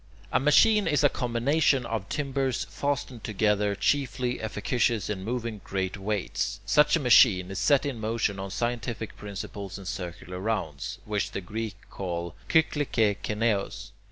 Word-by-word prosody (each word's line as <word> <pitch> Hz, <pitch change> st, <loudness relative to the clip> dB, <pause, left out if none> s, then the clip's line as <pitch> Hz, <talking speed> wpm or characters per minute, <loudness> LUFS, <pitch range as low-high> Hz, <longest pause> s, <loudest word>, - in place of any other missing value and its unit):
A -, -, +3 dB
machine 205 Hz, -, +5 dB
is 150 Hz, -2 st, +2 dB
a 145 Hz, -, +6 dB
combination 130 Hz, +2 st, +1 dB
of 110 Hz, -4 st, -3 dB
timbers 135 Hz, -3 st, -1 dB
fastened 135 Hz, -4 st, -2 dB
together, 105 Hz, -1 st, +1 dB
chiefly 125 Hz, +3 st, 0 dB
efficacious 110 Hz, 0 st, 0 dB
in 95 Hz, -2 st, -4 dB
moving 115 Hz, -2 st, -3 dB
great 95 Hz, 0 st, -2 dB
weights. 100 Hz, 0 st, -2 dB
Such 150 Hz, +3 st, +4 dB
a -, -, +1 dB
machine 110 Hz, -, +5 dB
is 95 Hz, -, -3 dB
set 145 Hz, -1 st, +3 dB
in 135 Hz, -5 st, -3 dB
motion 110 Hz, -2 st, -1 dB
on 95 Hz, 0 st, -4 dB
scientific 120 Hz, 0 st, -3 dB
principles 100 Hz, -1 st, -6 dB
in 100 Hz, -, -10 dB
circular 90 Hz, -1 st, -6 dB
rounds, 95 Hz, -, -3 dB
which 105 Hz, -1 st, -2 dB
the -, -, -3 dB
Greeks 105 Hz, +1 st, -5 dB
call 85 Hz, -2 st, -4 dB, 0.2 s
[Greek: 160 Hz, -1 st, +4 dB
kyklike 110 Hz, -8 st, +1 dB
kineois]. 105 Hz, -2 st, -1 dB
110 Hz, 150 wpm, -27 LUFS, 100-125 Hz, 0.2 s, a